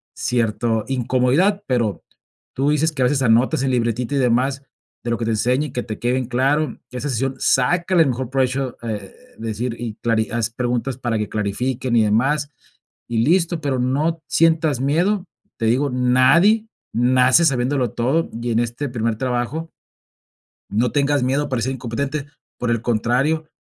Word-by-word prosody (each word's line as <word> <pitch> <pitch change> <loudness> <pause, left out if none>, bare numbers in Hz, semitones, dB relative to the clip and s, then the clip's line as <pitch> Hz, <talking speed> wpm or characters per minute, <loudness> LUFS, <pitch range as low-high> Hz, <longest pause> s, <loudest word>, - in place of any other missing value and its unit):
cierto 115 -1 0
incomodidad, 135 - +1
pero, 120 -6 -1 0.5
tu 135 +3 +1
dices 155 +2 +2
que 140 -4 -4
a - - +4
veces 135 +2 +1
anotas 120 +3 +3
en 135 - +1
libretita, 120 +1 -1
y - - +2
demás 130 +2 +1 0.4
de 120 - -3
lo 115 - 0
que 115 - -3
te 115 - 0
enseña, 125 +6 +1
y - - -11
que 125 - -2
te 110 -2 -6
quede 125 +2 0
en 130 - -1
claro. 135 +5 0
Que 125 - -6
esa 145 +3 -3
sesión 135 +2 -1
sácale 175 +6 +3
el 140 - 0
mejor 125 0 -3
provecho, 130 -1 -1
eh, 105 -4 -5 0.3
de 115 - -5
decir 115 +2 -3
y 115 -3 -5
clari 115 -1 0
haz 115 0 -1
preguntas 125 +1 -2
para 120 -3 -1
que 105 -1 -3
clarifiquen 120 +4 -2
y 115 - +5
demás, 135 +8 +1 0.6
y 115 - 0
listo. 170 +1 +2
Pero, 135 -3 -1
no 150 +6 0
sientas 160 -4 +2
miedo, 175 +8 +1 0.3
te 115 - -2
digo, 130 +5 +2
nadie 130 - +4 0.3
nace 125 +5 +4
sabiéndolo 130 -2 +1
todo, 135 +8 0
y 120 0 -2
en 115 - +2
este 120 +5 -2
primer 115 -2 -1
trabajo 130 +7 -2 1.0
no 115 +4 +1
tengas 145 -1 +1
miedo 135 +3 +1
a - - -5
parecer 130 0 -1
incompetente, 135 +4 -3 0.3
por 120 -1 -1
el 115 - +1
contrario, 125 +8 0
125 Hz, 175 wpm, -21 LUFS, 120-145 Hz, 1.0 s, y